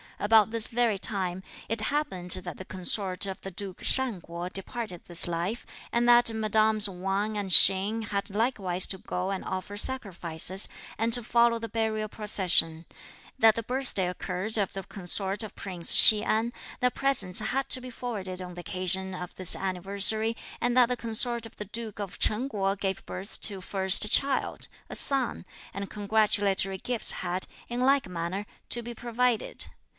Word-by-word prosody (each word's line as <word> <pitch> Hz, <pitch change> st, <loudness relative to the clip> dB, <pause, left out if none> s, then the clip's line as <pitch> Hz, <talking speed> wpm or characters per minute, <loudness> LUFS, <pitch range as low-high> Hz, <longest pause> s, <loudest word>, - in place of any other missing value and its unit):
About 220 Hz, 0 st, +4 dB
this 230 Hz, -1 st, +2 dB
very 235 Hz, -4 st, 0 dB
time, 185 Hz, -3 st, -3 dB, 0.3 s
it 225 Hz, 0 st, 0 dB
happened 220 Hz, -9 st, -3 dB
that 180 Hz, 0 st, -3 dB
the 185 Hz, -, -9 dB
consort 185 Hz, +1 st, 0 dB
of 190 Hz, -, -7 dB
the 195 Hz, -, -7 dB
Duke 190 Hz, 0 st, -7 dB
Shan 255 Hz, -9 st, +3 dB
Kuo 170 Hz, +2 st, -7 dB
departed 195 Hz, -2 st, -5 dB
this 175 Hz, 0 st, -1 dB
life, 175 Hz, +7 st, -4 dB, 0.3 s
and 235 Hz, 0 st, +1 dB
that 240 Hz, -1 st, +6 dB
mesdames 215 Hz, -1 st, +2 dB
Wang 195 Hz, +3 st, -3 dB
and 200 Hz, -2 st, -4 dB
Hsing 195 Hz, +5 st, +6 dB
had 200 Hz, -1 st, -3 dB
likewise 200 Hz, -4 st, 0 dB
to 190 Hz, -, -3 dB
go 180 Hz, +1 st, -4 dB
and 195 Hz, -, -4 dB
offer 190 Hz, +2 st, -5 dB
sacrifices, 190 Hz, -6 st, +1 dB, 0.3 s
and 225 Hz, +2 st, -1 dB
to 245 Hz, -, +4 dB
follow 235 Hz, 0 st, +2 dB
the 230 Hz, 0 st, -7 dB
burial 220 Hz, -1 st, -2 dB
procession; 180 Hz, -6 st, +2 dB, 0.5 s
that 220 Hz, -1 st, +5 dB
the 230 Hz, -, -3 dB
birthday 245 Hz, -6 st, -1 dB
occurred 185 Hz, +4 st, -4 dB
of 200 Hz, -3 st, -1 dB
the 195 Hz, -, -6 dB
consort 195 Hz, +1 st, -1 dB
of 215 Hz, -, -6 dB
Prince 180 Hz, -4 st, +2 dB
Hsi 215 Hz, -1 st, +9 dB
An; 225 Hz, +2 st, -1 dB, 0.3 s
that 250 Hz, 0 st, +1 dB
presents 240 Hz, -10 st, 0 dB
had 265 Hz, +5 st, -2 dB
to 255 Hz, -, +2 dB
be 255 Hz, -, -9 dB
forwarded 200 Hz, -7 st, -6 dB
on 180 Hz, -1 st, -8 dB
the 175 Hz, -, -7 dB
occasion 190 Hz, 0 st, 0 dB
of 180 Hz, -1 st, -8 dB
this 185 Hz, -2 st, +7 dB
anniversary; 200 Hz, +4 st, -1 dB, 0.2 s
and 245 Hz, +1 st, 0 dB
that 250 Hz, -2 st, +6 dB
the 250 Hz, 0 st, -2 dB
consort 235 Hz, +1 st, 0 dB
of -, -, -19 dB
the 210 Hz, -, -6 dB
Duke 220 Hz, +1 st, -7 dB
of 200 Hz, -3 st, -7 dB
Chen 225 Hz, +5 st, +1 dB
Kuo 195 Hz, -4 st, -1 dB
gave 195 Hz, -1 st, -3 dB
birth 190 Hz, +4 st, -7 dB
to 200 Hz, -2 st, +3 dB
a -, -, -10 dB
first 190 Hz, +3 st, +2 dB
child, 275 Hz, +2 st, 0 dB, 0.2 s
a -, -, -8 dB
son, 270 Hz, -8 st, -1 dB, 0.3 s
and 200 Hz, 0 st, -6 dB
congratulatory 205 Hz, -2 st, +1 dB
gifts 245 Hz, -3 st, +3 dB
had, 180 Hz, +2 st, -3 dB, 0.2 s
in 240 Hz, +1 st, -3 dB
like 270 Hz, -2 st, +2 dB
manner, 180 Hz, +3 st, -5 dB, 0.2 s
to 240 Hz, -, -1 dB
be 240 Hz, +1 st, -7 dB
provided. 240 Hz, 0 st, 0 dB
205 Hz, 175 wpm, -27 LUFS, 185-230 Hz, 0.5 s, Hsi